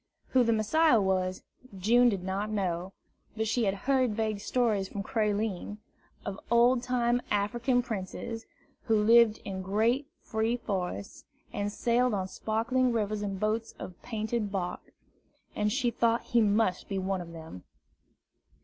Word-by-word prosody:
Who 255 -1 +4
the 230 - +2
Messiah 230 +5 +4
was, 185 -1 0 0.3
June 240 +6 +5
did 195 -5 -2
not 195 +3 -2
know; 185 -3 -2 0.5
but 220 0 0
she 235 +1 +1
had 195 0 +1
heard 260 -5 +2
vague 215 -2 -1
stories 215 -3 0
from 200 - -5
Creline, 210 -3 -1 0.5
of 200 0 -4
old 240 +1 +4
time 245 -1 +1
African 240 +5 +1
princes, 225 +1 -5 0.4
who 225 -3 +3
lived 225 0 +5
in 190 -2 -4
great 225 +8 +1
free 225 +2 -1
forests, 185 - -4 0.3
and 205 0 -2
sailed 240 +1 +1
on 190 -1 -2
sparkling 240 +6 0
rivers 215 -2 -1
in 200 -2 -3
boats 215 +3 -1
of 180 - -9
painted 220 -2 -2
bark, 185 -3 -4 0.6
and 210 0 +1
she 250 0 +1
thought 230 0 +2
that - - -21
he 235 - +5
must 205 -3 +1
be 195 - -2
one 190 0 -1
of 170 -1 -9
them. 160 - -10
215 Hz, 150 wpm, -29 LUFS, 195-235 Hz, 0.6 s, June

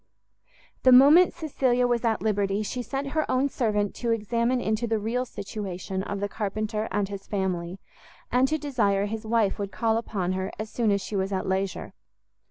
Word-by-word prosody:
The 255 - +5
moment 290 +8 +8
Cecilia 260 -6 0
was 240 -1 +1
at 225 -2 0
liberty, 205 -1 0
she 245 +4 -3
sent 275 +4 -4
her 310 +2 -1
own 265 +2 +2
servant 210 -6 0
to 240 - -2
examine 235 +3 +1
into 220 0 -1
the 225 0 +1
real 230 +4 -1
situation 195 -4 -5
of 200 +1 -4
the 205 - -1
carpenter 215 +1 -3
and 205 -1 0
his 200 0 -8
family, 185 -2 -2 0.5
and 250 +2 +4
to 310 - 0
desire 215 -10 +1
his 220 +1 -5
wife 220 -3 +1
would 200 -1 -3
call 225 +1 +1
upon 195 -5 -2
her 190 0 -2
as 215 0 -6
soon 235 -3 +1
as 200 -1 +2
she 205 - -5
was 190 0 -1
at 190 -1 -2
leisure. 190 0 -2
215 Hz, 185 wpm, -26 LUFS, 200-245 Hz, 0.5 s, moment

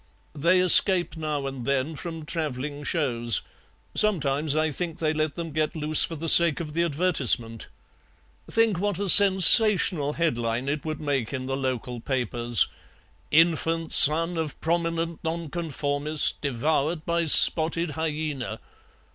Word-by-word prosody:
"They 170 +5 0
escape 185 0 +4
now 155 -3 -6
and 135 -2 -8
then 140 +4 -3
from 165 0 -9
travelling 145 -3 -6
shows. 120 - -2 0.5
Sometimes 150 -7 0
I 155 0 -2
think 165 +2 -7
they 155 -1 -3
let 155 -1 -4
them 170 -2 -8
get 155 +2 -4
loose 155 0 +2
for 165 - -5
the 165 +2 -7
sake 170 -1 +5
of 155 -3 -8
the 170 - -2
advertisement. 140 -9 -1 0.8
Think 225 -5 -1
what 205 -2 -3
a 200 +1 -5
sensational 190 -5 +6
headline 120 -6 -4
it 145 0 -4
would 155 -1 -6
make 140 -6 -4
in 130 -1 -6
the 135 0 -5
local 130 -2 -6
papers: 120 -2 0 0.6
'Infant 165 0 -1
son 165 +3 +5
of 160 -3 -5
prominent 165 0 -4
Nonconformist 155 -3 -3
devoured 150 +4 -3
by 170 -1 -3
spotted 165 +2 +5
hyaena.' 155 -4 -6
155 Hz, 135 wpm, -23 LUFS, 140-170 Hz, 0.8 s, sensational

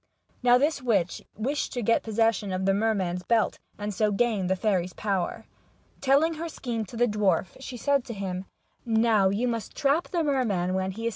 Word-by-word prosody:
Now 245 0 +6
this 285 +2 +1
witch 200 -8 0
wished 270 +7 -2
to 245 - -2
get 230 +2 +3
possession 225 -2 +1
of 185 0 -1
the 195 - +3
merman's 195 -4 0
belt, 225 +3 +1 0.2
and 205 0 -4
so 210 +2 +1
gain 205 -3 +1
the 190 - +2
fairy's 185 -2 0
power. 200 +1 -2 0.6
Telling 280 +5 +3
her 330 +1 -5
scheme 235 -7 -4
to 230 - -10
the 240 - +4
dwarf, 205 -4 +1
she 260 -2 -7
said 280 +1 +1
to 235 - -6
him: 190 -1 -4 0.3
" - - -42
Now 220 -4 +3
you 215 +6 0
must 230 -3 -3
trap 295 +3 +1
the 345 -3 0
merman 220 - 0
when 190 0 0
he 225 +4 -5
is. - - +2
220 Hz, 200 wpm, -27 LUFS, 195-245 Hz, 0.6 s, Now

